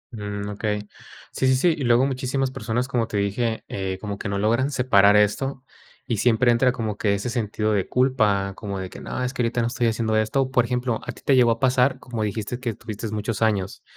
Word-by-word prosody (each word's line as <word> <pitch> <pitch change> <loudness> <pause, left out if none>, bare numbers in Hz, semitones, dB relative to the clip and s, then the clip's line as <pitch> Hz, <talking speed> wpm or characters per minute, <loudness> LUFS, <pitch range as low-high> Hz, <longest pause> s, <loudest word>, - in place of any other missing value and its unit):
Mm, 105 -1 -5
okey. 105 0 -3 0.4
Sí, 130 - 0
sí, 130 - +4
sí, 165 +5 +3
y 140 - -4
luego 120 +2 +4
muchísimas 130 0 -1
personas, 120 +2 -2
como 120 -4 0
te 105 - -3
dije, 110 +3 -1
eh, 95 -1 -3
como 100 -1 -5
que 100 - -4
no 100 - -1
logran 115 +7 +1
separar 105 -7 +4
esto, 130 +6 +1 0.4
y 115 -5 -1
siempre 120 +2 +3
entra 125 +2 +3
como 110 -4 -4
que 100 -2 +1
ese 100 +5 -3
sentido 110 -2 -1
de 100 -2 0
culpa, 110 -7 +2
como 100 -2 -5
de 95 -1 -5
que, - - -10
no, 125 - -4
es 125 +1 -2
que 125 - -2
ahorita 120 0 0
no 115 - +1
estoy 120 -1 0
haciendo 110 -1 0
esto. 130 +5 +1
Por 125 -2 +3
ejemplo, 125 -1 -1
a - - -5
ti - - -17
te 135 - +4
llegó 120 -2 +5
a 115 - -1
pasar, 130 0 +3
como 120 -3 -5
dijiste 110 +3 -3
que 125 -2 -3
estuviste 110 +1 -6
muchos 110 0 -3
años, 100 -4 0
115 Hz, 230 wpm, -23 LUFS, 105-125 Hz, 0.4 s, llegó